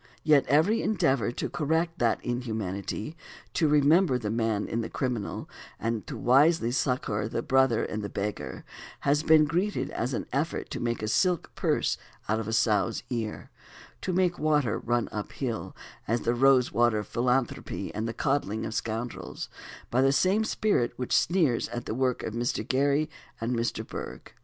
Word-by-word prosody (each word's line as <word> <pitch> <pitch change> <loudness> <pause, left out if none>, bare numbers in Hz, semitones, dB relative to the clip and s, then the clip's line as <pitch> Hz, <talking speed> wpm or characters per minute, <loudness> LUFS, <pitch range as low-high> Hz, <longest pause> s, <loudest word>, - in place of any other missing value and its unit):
Yet 150 -3 +4
every 160 +11 +3
endeavor 135 - +1
to - - -2
correct 165 +3 -1
that 115 -2 +1
inhumanity, 110 - -3 0.4
to 160 - +2
remember 150 +1 +4
the 105 -4 -3
man 110 -2 0
in 115 - -1
the 115 - -4
criminal, 125 -6 -3 0.3
and 115 -1 -2
wisely 140 0 +3
to - - -3
succor 125 -5 0
a 115 +2 -2
brother 130 -3 +3
in 110 - -4
the 100 - -4
beggar, 105 +1 -4 0.4
has 145 +1 +2
been 155 -1 +6
greeted 180 +7 -1
as 125 +2 -2
an - - -3
effort 150 +5 -2
to - - -3
make 120 -2 -2
a - - -1
silk 180 - +1
purse - - 0 0.3
of 110 0 0
a - - -2
sow's 115 - +1
ear, 115 -3 -4 0.5
to 185 - -2
make 180 -1 +1
water 150 -7 +2
run 120 0 0
uphill, 110 +3 -4 0.3
as 115 +2 +1
the 120 - +1
rose 130 0 +4
water 120 -3 +3
philanthropy 125 +3 -1
and 110 +1 -2
the 115 - -3
coddling 115 -6 0
of 110 - -4
scoundrels, 115 +2 -4 0.4
by 125 - +3
the 135 0 +4
same 185 +10 +3
spirit 210 - +1
which 125 - -1
sneers 160 -9 +2
at 120 - -5
the - - -3
work 130 +1 0
of - - -4
Mr. 120 -1 -2
Gerry 140 +3 +2 0.3
and 115 +2 -1
Mr. 115 0 -2
Bergh. - - -8
125 Hz, 165 wpm, -28 LUFS, 115-150 Hz, 0.5 s, been